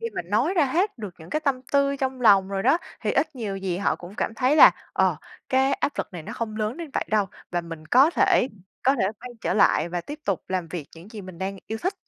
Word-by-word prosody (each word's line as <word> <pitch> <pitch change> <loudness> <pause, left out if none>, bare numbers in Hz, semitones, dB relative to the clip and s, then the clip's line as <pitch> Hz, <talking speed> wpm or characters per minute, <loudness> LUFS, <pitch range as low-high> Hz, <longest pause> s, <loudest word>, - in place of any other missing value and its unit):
khi 460 - -3
mình 175 +2 -5
nói 280 - +2
ra 325 - +4
hết 335 - 0
được 205 -5 -7
những 160 +1 -13
cái 305 - 0
tâm 275 -4 0
tư 280 0 +3
trong 265 -1 -3
lòng 195 -4 +5
rồi 195 -1 -2
đó, 330 - +4 0.2
thì - - -1
ít 310 -2 0
nhiều 205 -5 -3
gì 185 -2 -3
họ 200 - +1
cũng 180 +3 -11
cảm 225 - -2
thấy 265 +5 +2
là, - - +10 0.2
ờ, - - +2 0.3
cái 265 +1 +3
áp 290 - 0
lực - - -3
này 170 -3 -7
nó - - -7
không 215 -2 -4
lớn 215 +3 -2
đến 330 -3 -7
vậy - - -1
đâu, 210 -2 +2 0.2
và 175 0 0
mình 165 -2 -9
có 265 - +5
thể 265 - +3 0.3
có 270 +2 +4
thể 225 - 0 0.2
quay 250 0 -8
trở - - -1
lại 170 -5 +3
và 175 0 -3
tiếp 295 - -8
tục 195 -3 -1
làm 185 -3 -2
việc 160 -5 -6
những 170 +5 -13
gì 215 -3 -8
mình 185 -2 -10
đang 195 +1 -3
yêu 220 - -3
thích. 370 +3 0
215 Hz, 270 wpm, -25 LUFS, 185-275 Hz, 0.3 s, là